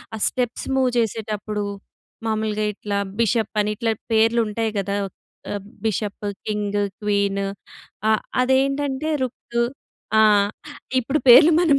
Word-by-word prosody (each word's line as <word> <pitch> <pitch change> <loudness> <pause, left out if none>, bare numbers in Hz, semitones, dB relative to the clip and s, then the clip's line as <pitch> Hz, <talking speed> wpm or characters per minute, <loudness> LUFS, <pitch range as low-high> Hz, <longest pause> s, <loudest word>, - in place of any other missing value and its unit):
ఆ - - -5
steps 245 -2 -2
move 260 -1 +3
చేసేటప్పుడు. 215 -2 -2 0.6
మామూలుగా 215 -1 0
ఇట్లా 200 0 -3 0.2
బిషప్ 225 -1 +1
అని 210 - 0
ఇట్లా 225 +2 0 0.2
పేర్లు 225 +1 +4
ఉంటాయి 220 +1 -1
కదా! 200 +1 -2 0.6
ఆహ్, 205 -1 -3 0.2
బిషప్, 210 -1 -2 0.2
కింగ్, 205 -1 -1 0.2
క్వీన్ 200 -1 +1 0.7
ఆహ్, 220 - +3 0.2
అదేంటంటే 275 +3 +1
రుకు. 235 -1 -2 0.6
ఆ! - - +7 0.8
ఇప్పుడు 275 +5 0
పేర్లు 270 +7 +9
మనం 295 -5 +4
220 Hz, 115 wpm, -22 LUFS, 210-250 Hz, 0.8 s, పేర్లు